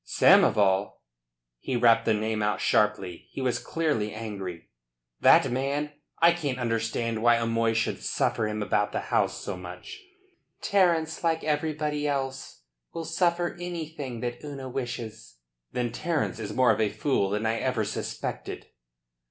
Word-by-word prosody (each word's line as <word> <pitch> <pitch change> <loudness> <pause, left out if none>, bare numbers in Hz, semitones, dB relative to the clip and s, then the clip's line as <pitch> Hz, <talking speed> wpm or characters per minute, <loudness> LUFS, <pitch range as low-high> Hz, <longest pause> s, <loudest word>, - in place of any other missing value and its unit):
"Samoval!" 100 -1 +4 0.7
he 130 - -3
rapped 115 -1 +4
the 110 - +3
name 110 0 -1
out 105 0 0
sharply. 100 -5 +1
He - - -8
was 130 -2 0
clearly 145 -11 -1
angry. 100 -6 -6 0.5
"That - - +6
man! 140 +4 -1 0.3
I 170 +1 +7
can't 145 -7 -2
understand 115 -1 -1
why 120 0 +5
O'Moy 115 0 +1
should 115 - -1
suffer 110 - 0
him 105 0 -2
about 105 0 0
the - - 0
house - - +2
so 100 - -4
much." 90 - -9 0.6
"Terence, 170 -5 +2
like 165 -1 +1
everybody 150 -1 -1
else, 135 - -3 0.3
will 165 -1 -4
suffer 175 +1 0
anything 155 -8 -5
that 120 +1 -4
Una 140 -3 -6
wishes." 115 - -6 0.4
"Then 120 -2 -1
Terence 160 -5 -1
is 105 - -4
more 130 -3 +4
of 110 0 +1
a 105 - +2
fool 105 -1 0
than 105 +2 -1
I 115 0 +1
ever 125 -5 0
suspected." - - -5
120 Hz, 145 wpm, -27 LUFS, 110-150 Hz, 0.7 s, I